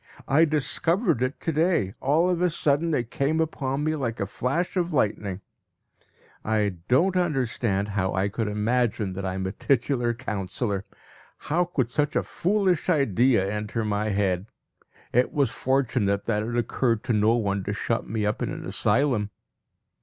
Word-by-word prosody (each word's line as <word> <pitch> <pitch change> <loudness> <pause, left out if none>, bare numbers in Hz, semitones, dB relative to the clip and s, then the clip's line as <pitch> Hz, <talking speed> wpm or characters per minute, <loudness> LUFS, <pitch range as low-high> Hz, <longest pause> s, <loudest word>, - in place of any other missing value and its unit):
I 155 +4 +5
discovered 165 - 0
it 130 +2 -1
to 165 - -1
day; 155 - +1
all 155 +6 +2
of 180 -1 0
a 180 - +3
sudden 160 0 +1
it 120 -2 -2
came 150 +4 0
upon 145 -3 -1
me 155 +1 0
like 120 -6 -3
a 100 - 0
flash 135 - -2
of 180 -1 0
lightning. 105 - -1 1.0
I 105 -1 +1 0.2
do 130 +6 +4
not - - 0
understand 120 - 0
how 95 -2 -1
I 95 +1 +1
could 110 +2 -2
imagine 105 -1 0
that 95 +1 -5
I 95 0 -2
am 95 0 -3
a 95 - -2
titular 120 0 0
councillor. 100 -3 -3 0.5
How 175 +4 0
could 130 -9 -1
such 150 +1 0
a - - +2
foolish 185 -2 0
idea 125 - +3
enter 105 +2 -2
my 105 0 0
head? 100 -1 0 0.7
It 125 +1 +3
was 140 -2 +2
fortunate 125 -7 0
that 105 -2 0
it 120 +2 -3
occurred 115 -1 0
to 120 - 0
no 110 +2 +3
one 100 -4 -1
to - - -2
shut - - -2
me 110 0 -1
up 105 - -1
in - - -1
an - - -6
asylum. 115 -2 +1
120 Hz, 170 wpm, -25 LUFS, 105-150 Hz, 1.0 s, I